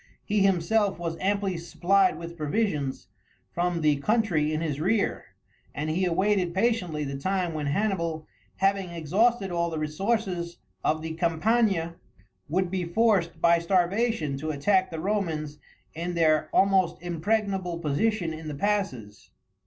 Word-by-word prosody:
He 210 0 +1
himself 195 +2 +2
was 165 -1 -3
amply 195 -1 0
supplied 175 +2 +2
with 170 0 -8
provisions 150 - -2 0.4
from 175 -1 -1
the 150 -2 +3
country 175 -4 +1
in 155 - -1
his 155 -3 -2
rear, 200 +5 0 0.5
and 155 +2 -2
he 185 +4 +1
awaited 185 0 +1
patiently 190 -8 0
the 140 -1 -4
time 185 +1 -1
when 150 -2 -3
Hannibal, 170 -2 -1 0.3
having 195 -1 +1
exhausted 190 +6 +1
all 170 0 0
the 160 - -4
resources 175 +2 -2 0.3
of 155 0 0
the 160 - -4
Campania, 170 +1 +1 0.5
would 180 +2 0
be 185 -1 -1
forced 175 -2 +1
by 170 +1 +4
starvation 180 - +1
to 155 +3 -4
attack 185 +6 +2
the 165 -2 -5
Romans 160 -6 -2 0.3
in 175 +2 -4
their 155 -2 +3
almost 190 -3 +3
impregnable 185 +1 -1
position 170 +3 0
in 160 0 -8
the 150 - -4
passes. 140 - -2
175 Hz, 140 wpm, -27 LUFS, 155-195 Hz, 0.5 s, by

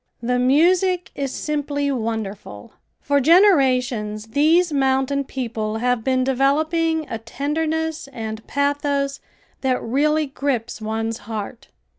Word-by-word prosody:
The 250 +1 0
music 350 +7 +3
is 275 -2 -3
simply 285 -1 -2
wonderful. 220 - -5 0.3
For 285 0 +2
generations 255 - +3
these 315 +6 +3
mountain 270 0 +1
people 225 -5 -3
have 245 0 0
been 260 0 +1
developing 310 +4 +1
a 225 - -5
tenderness 315 +6 -2
and 220 -4 -6
pathos 280 -1 0 0.4
that 260 -2 +1
really 300 +6 +1
grips 270 -5 -3
one's 225 +1 -3
heart. 220 +2 -6
270 Hz, 110 wpm, -21 LUFS, 230-300 Hz, 0.4 s, music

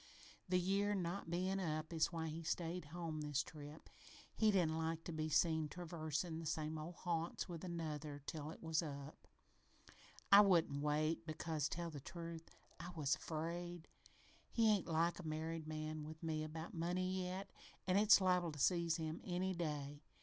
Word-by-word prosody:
The 180 0 +4
year 200 +3 +2
not 180 -1 -2
bein' 185 +3 0
up 155 -2 -2
is 160 -1 +2
why 160 -1 -2
he 160 +2 -4
stayed 170 +1 -2
home 160 0 -4
this 145 -1 0
trip. 150 0 -10 0.5
He 220 - +4
didn't 165 -6 +3
like 160 0 -1
to - - -5
be 155 -1 -1
seen 160 0 +3
traversin' 160 0 -3
the 165 - -4
same 155 0 -1
old 165 +3 -6
haunts 170 -1 -2
with 170 -1 -6
Another 155 -4 -3
till 155 -1 -4
it 165 - -9
was 160 0 +2
up. 140 -2 -7 1.0
I 200 +1 +12
wouldn't 170 -8 +4
wait 155 +3 +1
because, 155 -2 -1
tell 170 0 -3
the 145 - -6
truth, 165 +2 -7 0.3
I 170 +2 -5
was 150 -3 +2
afraid. 170 +2 -4 0.6
He 225 -2 +4
ain't 200 - 0
like 165 +2 +2
a - - -6
married 160 +1 -3
man 155 0 -3
with 155 +2 -8
me 155 -1 0
about 160 +1 -6
money 185 +2 0
yet, 190 +2 -4 0.3
an' 185 +1 +3
it's 210 +1 +8
liable 180 -3 +3
to 150 - -8
seize 170 +1 +3
him 160 -1 -3
any 185 +1 0
day. 145 -4 -3
165 Hz, 170 wpm, -40 LUFS, 155-175 Hz, 1.0 s, I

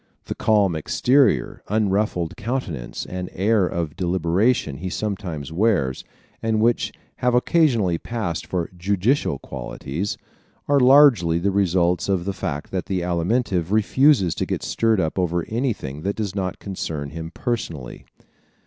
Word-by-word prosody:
The - - -3
calm 100 -5 +2
exterior, 125 - +2
unruffled 100 -5 0
countenance 100 - -4
and 90 0 -5
air 100 0 +2
of 85 -4 -3
deliberation 90 - +1
he 95 +5 -4
sometimes 90 -8 -4
wears, 85 - +1 0.4
and 110 -1 0
which 115 +2 +2 0.3
have 125 0 +1
occasionally 125 - +2
passed 105 -9 -4
for 90 -3 -2
"judicial" 100 - +1
qualities, 80 +9 -5 0.5
are 145 0 +4
largely 125 - +6
the 95 +4 0
results 90 -2 +1
of 95 -3 0
the 100 - -2
fact 75 -6 -4
that 95 -1 -3
the 95 -2 -1
Alimentive 90 +1 0
refuses 110 - +4
to - - -3
get - - -3
stirred 115 -3 +1
up 80 +1 -1
over 85 -1 0
anything 110 - -3
that 100 +4 -2
does 105 -3 -3
not 95 -2 -3
concern 80 -7 -5
him 80 +1 -6
personally. 85 - -4
95 Hz, 140 wpm, -22 LUFS, 85-110 Hz, 0.5 s, largely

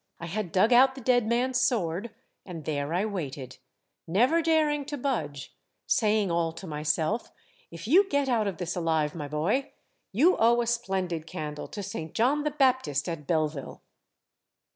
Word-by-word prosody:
I 170 - -6
had 185 +1 -4
dug 210 +7 +4
out 260 +2 +6
the - - -8
dead 245 -2 +2
man's 250 +2 +1
sword, 210 -5 0 0.3
and 165 -5 -8
there 145 -1 -2
I 180 +5 +1
waited, 140 - -5 0.5
never 245 - +3
daring 310 -3 +2
to 290 +1 -5
budge, 220 - -3 0.3
saying 210 -4 +2
all 170 -1 0
to 170 - -9
myself; 155 +7 -1 0.2
' - - -32
If 170 +4 -8
you 380 - +5
get 285 -1 +1
out 230 -5 +1
of 195 - -3
this 180 0 -4
alive, 160 -4 0
my 150 -4 -5
boy, 170 - -1 0.4
you 305 - +4
owe 235 +1 +4
a - - -1
splendid 190 -8 -2
candle 150 -2 -6
to 205 - -7
St. 165 -5 -6
John 265 +6 +2
the - - +2
Baptist 260 - +1
at 160 -4 -5
Belleville 155 -4 -2
195 Hz, 170 wpm, -27 LUFS, 160-250 Hz, 0.5 s, out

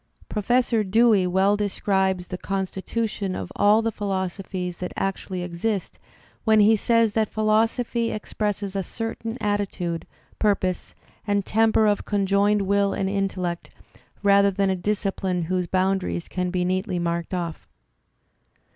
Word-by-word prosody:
Pro 210 - -2
fessor 240 0 +2
Dewey 210 -1 +4
well 190 +3 +3
describes 190 -3 0
the 185 - -4
constitution 195 +1 -3
of - - -5
all 210 +2 +4
the 225 - 0
philos 190 -3 -2
ophies 180 -2 -5
that 180 - -4
actually 190 -1 -2
exist 180 +3 -3 0.4
when 220 -1 +4
he 215 +2 +6
says 230 0 +2
that 220 -1 +1
philosophy 225 +2 +1
expresses 205 -2 -3
a 195 - 0
certain 225 +3 -5
attitude, 195 -5 -2 0.3
purpose, 190 -4 0 0.3
and 205 -1 +1
temper 220 0 +3
of 205 -1 +2
conjoined 200 0 +2
will 200 0 +2
and 190 0 -1
intellect, 185 -3 -2 0.5
rather 200 0 +5
than 195 0 +1
a - - +1
discipline 190 -2 -1
whose 180 +1 -1
boundaries 185 -2 0
can 180 -1 -2
be 180 0 0
neatly 185 +1 -1
marked 170 -1 -2
oflf. 175 -3 -3
195 Hz, 140 wpm, -24 LUFS, 185-210 Hz, 0.5 s, he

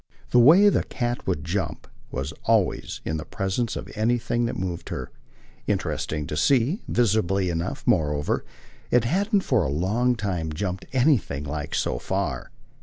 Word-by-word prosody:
The 125 - +6
way 165 +12 +8
the - - +2
cat 120 -1 -3
would 85 -6 -1
jump 90 +4 -3 0.2
was 70 +4 -4
always, 110 -4 +1
in 80 0 -2
presence 95 +8 -2
of - - -5
anything 120 +2 +1
that 120 - -3
moved 90 -3 -4
her, 65 - -5 0.6
interesting 75 -1 -1
to 75 - -4
see; 135 - +2
visibly 100 -5 +2
enough, 85 +3 -3
moreover, 75 - +1 0.5
it 125 -2 +4
hadn't 200 - +1
for 125 - +2
a 75 - -1
long 105 - +1
time 90 -8 -2
jumped 95 +2 -3
anything 125 - +2
like 75 0 -4
so - - 0
far. - - -2
100 Hz, 150 wpm, -25 LUFS, 80-120 Hz, 0.6 s, way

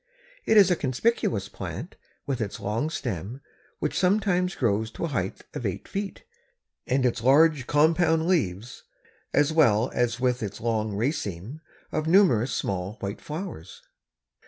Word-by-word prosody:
It 220 - +5
is 195 -3 +7
a - - +4
conspicuous 130 - 0
plant, 95 - -7 0.3
with 135 -4 -2
its 105 -2 -4
long 115 +9 -1
stem, 120 - -4 0.4
which - - -2
sometimes 185 -1 +2
grows 110 -2 0
to 140 - -4
a - - -3
height 95 -9 -3
of - - -5
eight - - -3
feet, 195 -1 -5 0.6
and 130 0 +1
its 120 -1 0
large 140 +1 +4
compound 160 +2 +3
leaves, 120 - -1 0.5
as 145 +2 +2
well 120 -7 +4
as 120 -1 0
with 125 -1 +1
its 100 -2 -5
long 110 -2 -1
raceme 115 - -3 0.3
of 155 0 -2
numerous 160 - +4
small 95 0 -3
white 100 0 -5
flowers. 155 - -7
130 Hz, 145 wpm, -26 LUFS, 105-160 Hz, 0.6 s, is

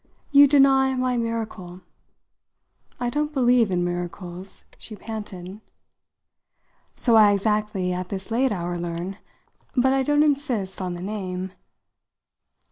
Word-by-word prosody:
You 285 0 +8
deny 270 -1 +4
my 255 -1 0
miracle." 220 -6 -4 1.2
"I 245 -1 -1
don't 295 +3 -1
believe 245 -5 +3
in 180 -1 0
miracles," 175 +1 -5 0.2
she 215 - -9
panted. 205 -3 -8 1.3
"So 235 -3 +3
I 210 -2 +7
exactly, 205 -2 0
at 180 0 -4
this 195 +2 -6
late 255 +3 +2
hour, 175 -2 -3
learn. 175 +3 -5 0.6
But 260 +1 +3
I 270 - +2
don't 290 +2 +3
insist 260 -11 -1
on 180 -1 -3
the 175 - -7
name. 190 -2 -4
210 Hz, 125 wpm, -24 LUFS, 185-255 Hz, 1.3 s, You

